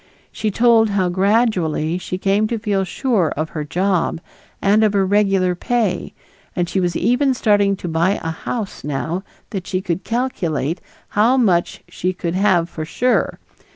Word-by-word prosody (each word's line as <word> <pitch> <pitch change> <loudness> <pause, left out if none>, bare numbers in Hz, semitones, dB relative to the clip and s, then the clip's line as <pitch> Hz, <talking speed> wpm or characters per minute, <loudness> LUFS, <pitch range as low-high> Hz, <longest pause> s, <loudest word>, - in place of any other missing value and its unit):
She 215 - -2
told 225 +1 +4
how 190 -3 +1
gradually 185 -5 +1
she 185 - -4
came 200 +3 +1
to 230 - -2
feel 205 -3 0
sure 190 - 0
of 155 +1 -2
her 155 - -4
job 180 +2 0 0.4
and 210 +2 +3
of 210 -1 +3
her 195 -1 +2
regular 195 -2 +2
pay, 205 -1 -1 0.4
and 175 -1 0
she 190 - -1
was 175 -2 0
even 250 +6 +2
starting 205 -4 +3
to 180 - -7
buy 170 +4 +1
a 165 - -2
house 205 +5 -5
now 150 +5 -2 0.3
that 195 -5 -5
she 185 - -1
could 180 0 -3
"calculate" 175 - -2 0.3
how 230 +5 +3
much 185 -9 +1
she 185 +1 -2
"could 170 -2 -3
have 180 -3 +2
for 165 -2 -6
sure." 245 +10 0
190 Hz, 165 wpm, -19 LUFS, 175-215 Hz, 0.4 s, told